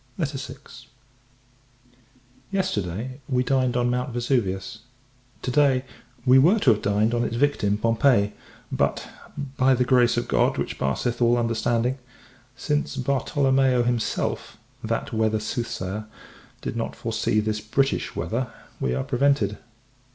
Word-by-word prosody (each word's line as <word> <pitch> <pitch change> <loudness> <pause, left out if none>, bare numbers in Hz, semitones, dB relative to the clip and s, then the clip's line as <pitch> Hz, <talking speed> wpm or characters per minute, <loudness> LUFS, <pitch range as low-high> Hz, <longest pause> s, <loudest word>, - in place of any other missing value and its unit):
VI. 140 -4 -3 2.0
Yesterday, 130 - -2
we 125 -1 +2
dined 130 -1 +1
on 120 0 +2
Mount 125 +1 -1
Vesuvius; 115 -5 -1 0.6
to 125 - -1
day, 135 -1 +3 0.4
we 130 +1 +7
were 175 +11 +5
to 150 - +4
have 105 - +1
dined 105 +3 +1
on 120 0 +1
its 115 - -2
victim, 120 -6 +1
Pompeii: 115 -1 +3 0.4
but, - - 0 0.5
"by 130 -1 +4
the 125 0 +1
grace 120 -2 +4
of 120 - -1
God, - - +2
which - - -3
passeth 120 - -1
all 120 0 +4
understanding," 115 +2 0 0.6
since 145 +2 -1
Bartolomeo 135 -1 +2
himself, 120 -1 -2 0.3
that - - -2
weather 110 -1 +1
soothsayer, 110 -2 -4 0.5
did - - -4
not - - -3
foresee 110 - 0
this 110 0 -1
British 135 +6 0
weather, 120 +1 -2 0.3
we 65 -1 0
are - - -1
prevented. 135 -6 +1
120 Hz, 130 wpm, -24 LUFS, 110-135 Hz, 2.0 s, we